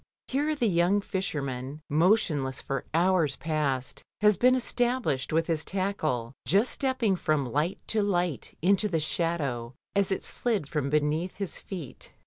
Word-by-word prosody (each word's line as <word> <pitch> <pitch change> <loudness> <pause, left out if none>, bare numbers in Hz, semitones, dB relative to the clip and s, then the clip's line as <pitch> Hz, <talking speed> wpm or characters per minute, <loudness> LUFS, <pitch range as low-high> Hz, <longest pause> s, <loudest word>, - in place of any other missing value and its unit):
Here 295 +3 +1
the 260 -5 0
young 180 +2 +3
fisher 190 -7 -2
man, 130 +2 -5
motionless 155 -5 +2
for 135 - -3
hours 170 -3 +2
past, 140 -3 -2 0.2
had 210 -1 +4
been 255 +1 +5
established 245 - 0
with 165 +1 +2
his 160 -2 0
tackle, 160 -11 -2
just 200 - +4
stepping 260 -7 +1
from 155 -5 0
light 150 - 0
to 220 - +2
light 175 - -1
into 200 +3 +4
the 165 -4 +1
shadow 145 -7 -1 0.2
as 200 -1 +2
it 190 - -1
slid 215 - -1
from 145 -2 -1
beneath 150 +4 0
his 195 -3 -4
feet. 175 -9 -8
170 Hz, 150 wpm, -28 LUFS, 145-200 Hz, 0.2 s, been